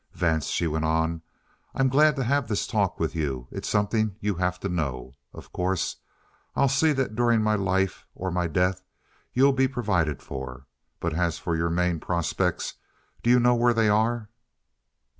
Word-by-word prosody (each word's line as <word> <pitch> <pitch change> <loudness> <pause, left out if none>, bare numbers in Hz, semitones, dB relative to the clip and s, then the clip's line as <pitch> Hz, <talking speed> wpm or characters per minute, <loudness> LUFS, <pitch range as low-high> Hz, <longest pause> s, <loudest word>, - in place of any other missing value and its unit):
"Vance," 80 -4 0
she - - 0
went 80 0 -1
on, 80 +1 0 0.5
"I'm 135 0 +3
glad 150 +4 +4
to 135 - -1
have 140 0 +1
this 105 -2 -1
talk - - 0
with - - -1
you. 70 -6 -3
It's - - -5
something 105 0 +1
you 105 -1 0
have 90 0 -1
to - - -2
know. 70 -8 -3 0.2
Of - - -13
course 90 0 -1 0.6
I'll 140 - +3
see 145 +4 +3
that 135 -5 -1
during 120 -1 +2
my 110 0 +2
life 95 -2 0
or 95 0 -3
my 90 0 0
death 90 +3 0 0.5
you'll 135 +2 +4
be 135 0 +3
provided 105 - -1
for. 65 0 -7 0.3
But 85 -1 -2
as 85 0 0
for 85 - -2
your 85 +1 0
main 85 0 0
prospects, 85 0 -1 0.4
do 120 - 0
you 125 +1 +6
know 125 0 +4
where 120 0 +3
they 110 -2 +3
are?" 110 +1 +1
95 Hz, 180 wpm, -26 LUFS, 85-120 Hz, 0.6 s, you